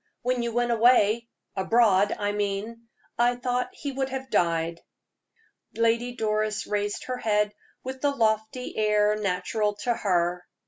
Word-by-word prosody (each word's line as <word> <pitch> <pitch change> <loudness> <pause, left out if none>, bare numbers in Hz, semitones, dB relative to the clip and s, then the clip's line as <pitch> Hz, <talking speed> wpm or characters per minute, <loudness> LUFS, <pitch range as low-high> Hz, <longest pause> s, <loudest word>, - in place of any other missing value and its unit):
"When 250 0 0
you 235 0 -2
went 240 +1 0
away 235 -1 +4 0.3
abroad, 205 0 +3
I 205 0 -1
mean 205 +3 -3 0.3
I 240 +1 +3
thought 250 0 -1
he 285 - -5
would 265 0 -2
have 265 -1 -6
died." 165 -1 +1 0.9
Lady 230 +2 +1
Doris 215 -1 -1
raised 205 0 -2
her 255 0 -4
head 210 -2 +1 0.3
with 260 0 -6
the 290 - +3
lofty 220 -1 -1
air 210 -1 +3
natural 205 +1 -1
to 240 - +2
her. 180 -4 0
220 Hz, 140 wpm, -26 LUFS, 205-245 Hz, 0.9 s, away